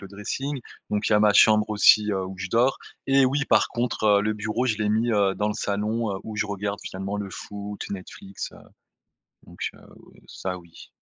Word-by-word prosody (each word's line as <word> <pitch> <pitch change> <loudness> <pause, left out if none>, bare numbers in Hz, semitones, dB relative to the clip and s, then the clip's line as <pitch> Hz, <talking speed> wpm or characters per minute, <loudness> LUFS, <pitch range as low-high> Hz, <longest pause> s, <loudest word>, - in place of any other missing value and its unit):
le 100 - -10
dressing. 130 +8 -4 0.3
Donc 105 0 0
il - - +1
y - - +6
a - - +3
ma 105 -1 +5
chambre 110 +1 +5
aussi, 105 0 +5
heu, 95 -2 -1
où 95 0 -8
je 95 0 -5
dors. 120 +6 +2 0.3
Et 135 0 +5
oui, 135 +2 +1
par - - +4
contre, 120 -2 -2
heu, - - +2
le 110 0 0
bureau 110 +4 -2
je 110 -3 +1
l'ai 105 -1 0
mis 115 +2 +1
heu 100 -2 +2
dans 105 0 0
le 105 - -2
salon, 105 +2 -1
heu, - - -6
où 110 -1 -7
je 105 - 0
regarde 100 0 -3
finalement 95 +2 -5
le 100 -2 -5
foot, 105 +2 -7
Netflix, 95 0 -7
heu - - -14 0.9
Donc - - -15
heu - - -17 0.2
ou - - -18
ça, 90 -1 -5
oui. 85 -1 -15
105 Hz, 225 wpm, -25 LUFS, 100-110 Hz, 0.9 s, y